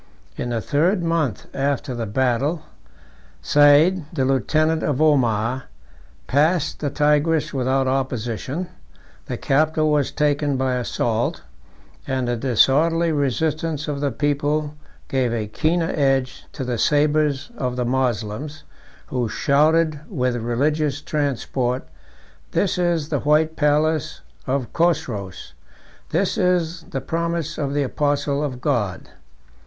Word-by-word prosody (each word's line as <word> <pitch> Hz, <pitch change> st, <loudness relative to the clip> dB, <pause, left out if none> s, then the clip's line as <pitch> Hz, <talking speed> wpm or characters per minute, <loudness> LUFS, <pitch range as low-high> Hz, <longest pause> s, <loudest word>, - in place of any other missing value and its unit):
In 120 Hz, -, -4 dB
the 115 Hz, -2 st, -1 dB
third 170 Hz, -, +1 dB
month 165 Hz, -, -1 dB
after 140 Hz, 0 st, -1 dB
the 115 Hz, -2 st, -3 dB
battle, 130 Hz, +8 st, 0 dB, 0.8 s
Said, 145 Hz, -, +5 dB
the 130 Hz, -, 0 dB
lieutenant 155 Hz, +5 st, +1 dB
of 145 Hz, -2 st, -1 dB
Omar, 130 Hz, -5 st, +2 dB, 0.6 s
passed 155 Hz, +4 st, +1 dB
the 145 Hz, -, -1 dB
Tigris 150 Hz, +2 st, +1 dB
without 130 Hz, 0 st, +1 dB
opposition; 130 Hz, -, -2 dB, 0.6 s
the -, -, -3 dB
capital 155 Hz, +2 st, +2 dB
was 145 Hz, -3 st, +1 dB
taken 145 Hz, -1 st, +1 dB
by 130 Hz, 0 st, 0 dB
assault; 120 Hz, -, -1 dB, 0.6 s
and 130 Hz, -2 st, -1 dB
the 120 Hz, -, 0 dB
disorderly 150 Hz, +8 st, +3 dB
resistance 155 Hz, +2 st, -1 dB
of 145 Hz, -1 st, -3 dB
the 145 Hz, -, +1 dB
people 145 Hz, +3 st, -1 dB, 0.3 s
gave 130 Hz, -3 st, 0 dB
a 110 Hz, -2 st, -1 dB
keener 165 Hz, +10 st, 0 dB
edge 135 Hz, -3 st, 0 dB
to 140 Hz, -, -5 dB
the 125 Hz, -2 st, -2 dB
sabres 150 Hz, -, +2 dB
of 125 Hz, -, -2 dB
the 125 Hz, -1 st, -1 dB
Moslems, 130 Hz, +3 st, -2 dB, 0.5 s
who 125 Hz, -3 st, -1 dB
shouted 155 Hz, +3 st, +2 dB
with 125 Hz, -, -1 dB
religious 140 Hz, +5 st, 0 dB
transport, 135 Hz, -4 st, -2 dB, 0.7 s
"This 190 Hz, -2 st, +1 dB
is 170 Hz, -4 st, 0 dB
the 145 Hz, -, 0 dB
white 155 Hz, +2 st, +2 dB
palace 150 Hz, 0 st, +1 dB, 0.3 s
of 130 Hz, -2 st, -2 dB
Chosroes; 130 Hz, -, -1 dB, 0.6 s
this -, -, 0 dB
is 175 Hz, -2 st, 0 dB
the 135 Hz, -, -3 dB
promise 170 Hz, +1 st, -2 dB
of 140 Hz, -1 st, -2 dB
the 145 Hz, -, +2 dB
apostle 145 Hz, +1 st, 0 dB
of 130 Hz, -4 st, -4 dB
God!" 115 Hz, -11 st, -1 dB
145 Hz, 125 wpm, -22 LUFS, 130-155 Hz, 0.8 s, Said